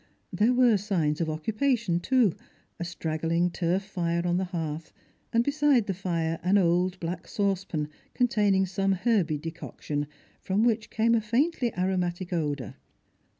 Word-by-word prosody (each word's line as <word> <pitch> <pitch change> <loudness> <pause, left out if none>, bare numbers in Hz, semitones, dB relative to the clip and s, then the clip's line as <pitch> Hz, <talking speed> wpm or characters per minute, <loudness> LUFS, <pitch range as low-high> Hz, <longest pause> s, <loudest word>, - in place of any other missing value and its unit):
There 215 +4 +3
were 245 -4 +5
signs 175 -7 0
of 165 - 0
occui^ation, 215 - 0
too; 245 -5 +3 0.5
a - - -2
strugghng 165 +1 -1
turf 180 +2 0
fire 170 -3 -2
on 175 0 +1
the 190 - 0
hearth, 160 -3 -4 0.4
and 230 0 +3
beside 285 -4 +3
the 195 - -1
fire 165 -3 -2
an 190 +3 +3
old 180 0 +2
black 170 +1 -4
saucepan 190 -6 -1 0.3
containing 205 -6 +3
some 195 +1 0
herby 185 -5 +1
decoction, 150 -2 -5 0.3
from 195 +3 0
which 230 -2 +1
came 225 +1 +2
a 230 - +3
faintly 240 +3 +1
aromatic 180 -1 -1
odour. 145 - -2
185 Hz, 145 wpm, -27 LUFS, 170-215 Hz, 0.5 s, were